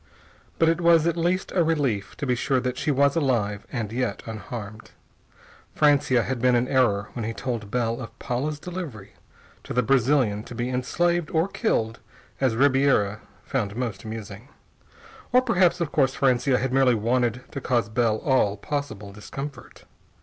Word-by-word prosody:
But 165 Hz, -, +3 dB
it 165 Hz, +1 st, +2 dB
was 170 Hz, -2 st, +5 dB
at 170 Hz, -1 st, +1 dB
least 175 Hz, +2 st, 0 dB
a 175 Hz, -, +2 dB
relief 140 Hz, -11 st, -1 dB
to 145 Hz, -, -3 dB
be 125 Hz, -, +1 dB
sure 130 Hz, +2 st, +1 dB
that 125 Hz, 0 st, -2 dB
she 140 Hz, -, -2 dB
was 140 Hz, +1 st, +3 dB
alive 115 Hz, -10 st, 0 dB
and 110 Hz, -4 st, -3 dB
yet 125 Hz, +1 st, -2 dB
unharmed. 110 Hz, 0 st, -7 dB, 0.9 s
Francia 145 Hz, -5 st, +3 dB
had 130 Hz, -2 st, -3 dB
been 125 Hz, 0 st, +4 dB
in 120 Hz, +1 st, +1 dB
error 115 Hz, -7 st, +2 dB
when 120 Hz, -, -4 dB
he 115 Hz, +1 st, -3 dB
told 115 Hz, -4 st, -4 dB
Bell 115 Hz, +1 st, -1 dB
of 115 Hz, -, -9 dB
Paula's 140 Hz, +4 st, -3 dB
delivery 160 Hz, -, -7 dB, 0.5 s
to -, -, -6 dB
the 125 Hz, -, +3 dB
Brazilian 125 Hz, -4 st, +2 dB
to 120 Hz, -, -9 dB
be 120 Hz, +1 st, -2 dB
enslaved 170 Hz, +6 st, 0 dB
or 160 Hz, +3 st, +1 dB
killed 115 Hz, -, -1 dB, 0.4 s
as 130 Hz, -4 st, +1 dB
Ribiera 130 Hz, -6 st, +3 dB, 0.2 s
found 105 Hz, -6 st, -2 dB
most 115 Hz, -5 st, -4 dB
amusing. 110 Hz, +1 st, -8 dB, 0.8 s
Or 250 Hz, -, +6 dB
perhaps, 185 Hz, -8 st, +2 dB
of 170 Hz, -4 st, -2 dB
course, 135 Hz, -3 st, +2 dB
Francia 130 Hz, 0 st, +2 dB
had 130 Hz, 0 st, -2 dB
merely 130 Hz, -2 st, +4 dB
wanted 120 Hz, +2 st, 0 dB
to 140 Hz, -, -5 dB
cause 120 Hz, -4 st, +1 dB
Bell 110 Hz, 0 st, +1 dB
all 115 Hz, -7 st, +2 dB
possible 110 Hz, -6 st, -5 dB
discomfort. 135 Hz, +6 st, -8 dB
125 Hz, 165 wpm, -25 LUFS, 115-145 Hz, 0.9 s, Or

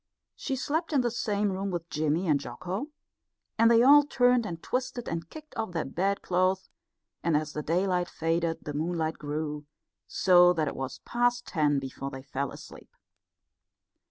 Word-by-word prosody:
She 270 Hz, -, -3 dB
slept 315 Hz, +5 st, -2 dB
in 275 Hz, -, +4 dB
the 240 Hz, -1 st, 0 dB
same 210 Hz, -3 st, 0 dB
room 195 Hz, +1 st, -3 dB
with 170 Hz, -2 st, -4 dB
Jimmy 155 Hz, +4 st, 0 dB
and 150 Hz, -3 st, +3 dB
Jocko, 180 Hz, -, -5 dB, 0.7 s
and 230 Hz, 0 st, +6 dB
they 235 Hz, 0 st, +6 dB
all 290 Hz, +3 st, +8 dB
turned 245 Hz, -5 st, +2 dB
and 170 Hz, -3 st, -5 dB
twisted 250 Hz, -1 st, -3 dB
and 165 Hz, 0 st, -4 dB
kicked 310 Hz, -1 st, -12 dB
off 220 Hz, -5 st, -3 dB
their 165 Hz, -, -1 dB
bedclothes; 185 Hz, +2 st, 0 dB, 0.5 s
and 165 Hz, -3 st, +2 dB
as 150 Hz, 0 st, -3 dB
the 150 Hz, -, -3 dB
daylight 180 Hz, +2 st, 0 dB
faded 165 Hz, 0 st, -1 dB
the 145 Hz, -, -5 dB
moonlight 160 Hz, +1 st, -2 dB
grew, 150 Hz, 0 st, -4 dB, 0.4 s
so 180 Hz, -1 st, +5 dB
that 160 Hz, -3 st, 0 dB
it -, -, -3 dB
was 135 Hz, -1 st, -5 dB
past 245 Hz, 0 st, +1 dB
ten 150 Hz, -4 st, +1 dB
before 135 Hz, 0 st, -5 dB
they 135 Hz, -1 st, -8 dB
fell 140 Hz, 0 st, -3 dB
asleep. -, -, -12 dB
175 Hz, 165 wpm, -28 LUFS, 155-230 Hz, 0.7 s, all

